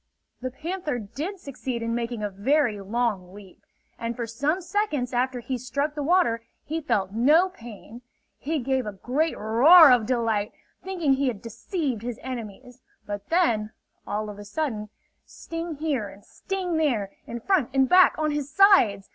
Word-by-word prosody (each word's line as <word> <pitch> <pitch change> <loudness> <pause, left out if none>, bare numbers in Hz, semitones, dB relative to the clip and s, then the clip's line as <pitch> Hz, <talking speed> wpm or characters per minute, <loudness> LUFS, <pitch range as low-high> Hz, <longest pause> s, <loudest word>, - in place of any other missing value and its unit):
The 255 - -3
panther 310 +1 -4
did 300 - -6
succeed 255 -5 -5
in 230 0 -2
making 235 -2 -3
a 205 - -2
very 230 +2 +1
long 200 -3 -2
leap, 200 -3 -14 0.4
and 230 0 -3
for 235 - -3
some 280 +10 -1
seconds 345 - -2
after 250 0 0
he 255 +1 -4
struck 280 +5 -2
the 300 - -4
water 295 -7 +2 0.2
he 320 +2 -4
felt 195 -10 0
no 295 - +4
pain. 235 - -12 0.4
He 315 +3 -2
gave 265 -2 -1
a 210 - -4
great 275 - -1
roar 275 +9 +7
of 235 -4 +3
delight, 225 -4 0 0.3
thinking 345 -7 0
he 270 +1 0
had 230 -5 -2
deceived 235 - -4
his 240 -1 -5
enemies. 245 0 -8 0.2
But 205 -1 -6
then, 230 -12 +1 0.3
all 210 0 -3
of 205 - -12
a - - -8
sudden, 215 -2 -3 0.3
sting 330 -1 -7
here 280 -9 -2
and 195 +1 -16
sting 370 -4 -3
there, 235 -11 0 0.2
in 235 - -5
front, 320 - +1
in 265 0 +3
back, 365 +7 +6
on 305 -1 0
his 290 -2 -3
sides! 310 - +5
250 Hz, 170 wpm, -25 LUFS, 220-310 Hz, 0.4 s, roar